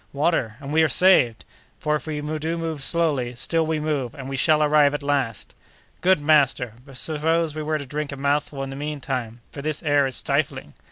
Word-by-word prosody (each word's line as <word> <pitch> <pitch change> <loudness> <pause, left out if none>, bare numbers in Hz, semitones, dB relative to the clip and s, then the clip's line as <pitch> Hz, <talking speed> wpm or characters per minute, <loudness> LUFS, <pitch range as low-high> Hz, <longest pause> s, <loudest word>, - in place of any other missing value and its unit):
water! 140 -6 0
and 140 0 -6
we 160 - +4
are 160 - +5
saved; 170 -11 +4 0.3
for 150 - -1
if 150 - -5
we 150 -1 -3
do 155 +2 -3
move 165 -3 -4
slowly, 140 -7 0
still 165 +6 0
we 160 -1 0
move, 145 -6 -2
and 135 -2 -8
we 135 - -4
shall 155 +3 +3
arrive 150 -1 +4
at 145 - -5
last!" 135 -6 -2 0.5
"Good, 185 -1 +4
master! 145 -6 +2
but 135 -2 -11
suppose 160 +2 0
we 155 - -4
were 155 0 -1
to 140 - -7
drink 150 +2 -4
a 140 - -6
mouthful 140 0 -1
in 135 - -5
the - - -6
mean 150 +1 -4
time, 120 -4 -4
for 140 - -7
this 155 +2 -3
air 145 -3 +3
is 130 - -1
stifling?" - - -1
145 Hz, 215 wpm, -23 LUFS, 135-155 Hz, 0.5 s, are